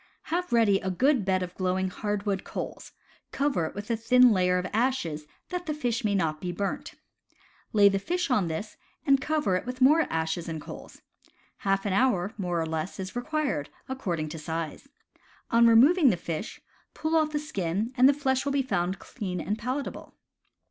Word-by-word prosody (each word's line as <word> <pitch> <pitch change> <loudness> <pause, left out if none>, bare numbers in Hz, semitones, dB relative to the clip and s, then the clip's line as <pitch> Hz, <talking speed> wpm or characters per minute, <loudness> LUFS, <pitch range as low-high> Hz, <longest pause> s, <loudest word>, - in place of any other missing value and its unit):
Have 360 +1 -1
ready 220 -5 +4
a 190 - -3
good 255 +6 +2
bed 185 -1 +1
of 180 0 -6
glowing 185 0 -1
hardwood 205 -1 -2
coals; - - -6 0.4
cover 270 - 0
it - - -10
with 205 +3 -5
a - - +2
thin 250 +2 +5
layer 180 -2 +3
of 180 - -2
ashes, 210 - 0 0.2
that 360 -1 -4
the 305 - -1
fish 240 -6 -1
may 205 -2 +1
not 155 -5 0
be 180 - -3
burnt. 195 +3 -4 0.8
Lay 205 -2 +6
the 195 -1 +2
fish 350 - -2
on 210 -8 +2
this, 165 +7 -5 0.3
and 275 -1 +4
cover 295 -10 +1
it 185 - -1
with 250 0 -5
more 300 +5 +5
ashes 160 +1 -2
and 160 -1 -4
coals. - - -11 0.5
Half 195 -1 0
an 200 - 0
hour, 200 -4 +2
more 180 -4 -2
or 165 - 0
less, 160 +4 -4
is 190 +2 -6
required, 275 - -2 0.2
accord 220 -11 -3
ing 155 0 -3
to 160 +1 -7
size. 160 - -5 0.6
On 235 0 +6
removing 275 +7 +6
the 190 - +1
fish, 170 +3 -5 0.4
pull 315 +1 -1
off 310 -1 +3
the 305 - -2
skin, 210 - -2
and 260 +1 +6
the - - +5
flesh 265 -2 0
will 280 - -1
be 275 -1 +2
found 185 -6 -1
clean 185 -7 -5
and 210 +3 -2
palatable. 255 +5 -4
205 Hz, 190 wpm, -27 LUFS, 180-265 Hz, 0.8 s, Lay